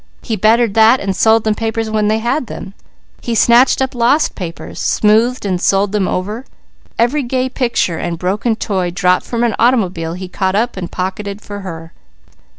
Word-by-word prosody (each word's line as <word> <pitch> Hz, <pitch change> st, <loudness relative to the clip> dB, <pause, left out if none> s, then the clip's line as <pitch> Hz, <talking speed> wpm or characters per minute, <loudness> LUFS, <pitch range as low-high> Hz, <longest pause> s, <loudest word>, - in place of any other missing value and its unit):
He 225 Hz, -, -2 dB
bettered 220 Hz, +2 st, +3 dB
that 225 Hz, +4 st, +5 dB
and 195 Hz, -1 st, -2 dB
sold 220 Hz, +2 st, +3 dB
them 215 Hz, -, +1 dB
papers 225 Hz, +1 st, -2 dB
when 215 Hz, -1 st, +1 dB
they 215 Hz, +1 st, +2 dB
had 235 Hz, +4 st, -1 dB
them. 195 Hz, -, -8 dB, 0.5 s
He 235 Hz, -, -3 dB
snatched 240 Hz, +4 st, +4 dB
up 265 Hz, -, -3 dB
lost 245 Hz, +5 st, +2 dB
papers, 170 Hz, -4 st, -7 dB
smoothed 220 Hz, +3 st, +2 dB
and 185 Hz, -3 st, -1 dB
sold 195 Hz, 0 st, +2 dB
them 205 Hz, -3 st, 0 dB
over. 210 Hz, +7 st, -3 dB, 0.5 s
Every 245 Hz, +6 st, +2 dB
gay 255 Hz, 0 st, -1 dB
picture 235 Hz, -10 st, -1 dB
or 170 Hz, -1 st, -3 dB
broken 205 Hz, +6 st, -1 dB
toy 190 Hz, -5 st, -2 dB
dropped 180 Hz, +1 st, +1 dB
from 235 Hz, -1 st, -1 dB
an 235 Hz, -2 st, +1 dB
automobile 185 Hz, -9 st, +1 dB
he 185 Hz, +1 st, -6 dB
caught 190 Hz, +1 st, -1 dB
up 235 Hz, +4 st, 0 dB
and 180 Hz, -2 st, -6 dB
pocketed 195 Hz, +2 st, -4 dB
for 205 Hz, -1 st, -8 dB
her. 165 Hz, -4 st, -8 dB
215 Hz, 180 wpm, -16 LUFS, 185-235 Hz, 0.5 s, that